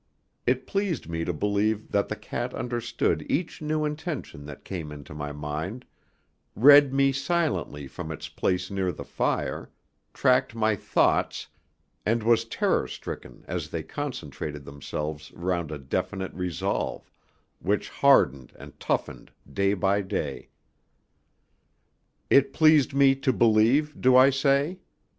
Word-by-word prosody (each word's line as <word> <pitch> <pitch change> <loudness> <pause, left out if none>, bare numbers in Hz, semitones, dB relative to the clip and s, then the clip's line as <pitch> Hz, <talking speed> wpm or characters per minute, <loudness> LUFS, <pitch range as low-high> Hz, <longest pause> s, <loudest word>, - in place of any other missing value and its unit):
It - - +1
pleased 195 -4 -2
me 85 0 -3
to - - 0
believe 105 +5 -1
that 100 0 +1
the 110 - -3
cat 120 +4 -5
understood 120 -1 -1
each 165 +1 -2
new 155 0 0
intention 150 - -5
that 75 -1 -10
came 85 -6 -5
into 75 -1 -10
my 75 -1 -5
mind, 75 +11 -5 0.7
read 140 +4 +8
me 135 0 +3
silently 135 - -1
from 80 +5 -7
its 80 - -6
place 90 +2 -1
near 95 -2 0
the - - -8
fire, - - -2 0.4
tracked 130 -2 +2
my 110 -1 +2
thoughts, - - +1 0.6
and 115 +2 +1
was 115 0 +3
terror 115 - 0
stricken - - -8
as - - -4
they - - -4
concentrated 75 -2 -6
themselves 75 +2 -6
round 85 -2 -2
a 75 - -4
definite 95 +8 -3
resolve, 90 -5 -3 0.5
which - - 0
hardened 65 -2 +3
and - - -13
toughened - - -2 0.2
day 100 +1 +2
by 100 +2 +1
day. 95 - -4 1.8
It 140 0 +4
pleased 155 -3 +4
me 140 -1 +6
to 135 -1 +1
believe, 120 +7 +3
do 130 0 +6
I 130 +2 +7
say? 140 +6 +1
110 Hz, 135 wpm, -26 LUFS, 85-135 Hz, 1.8 s, read